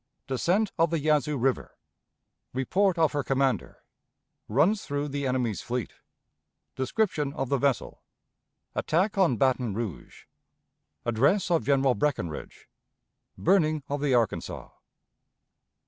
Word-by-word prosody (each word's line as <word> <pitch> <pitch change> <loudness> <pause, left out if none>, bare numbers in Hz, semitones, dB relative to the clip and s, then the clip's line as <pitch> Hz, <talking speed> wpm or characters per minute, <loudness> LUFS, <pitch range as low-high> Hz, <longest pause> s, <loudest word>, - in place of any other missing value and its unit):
Descent 180 - +1
of 165 +1 +4
the 165 - 0
Yazoo 150 -1 +1
River. 130 +1 -1 0.8
Report 180 +9 +1
of 160 -2 +3
her 145 -2 -1
Commander. 135 -1 -1 0.6
Runs 165 - +2
through 145 +1 -3
the 140 0 -2
Enemy's 125 -5 -1
Fleet. 120 -1 -3 0.8
Description 150 - 0
of 135 -5 -3
the 140 - +1
Vessel. 140 -1 -1 0.7
Attack 185 +6 +1
on 165 -11 +3
Baton 125 -4 +1
Rouge. 110 -6 -6 0.8
Address 140 - +2
of 165 - +2
General 135 -2 +3
Breckinridge. 125 - -3 0.7
Burning 155 -5 +2
of 145 0 -2
the 140 -3 +2
Arkansas. 115 -5 -1
140 Hz, 115 wpm, -27 LUFS, 130-165 Hz, 0.8 s, of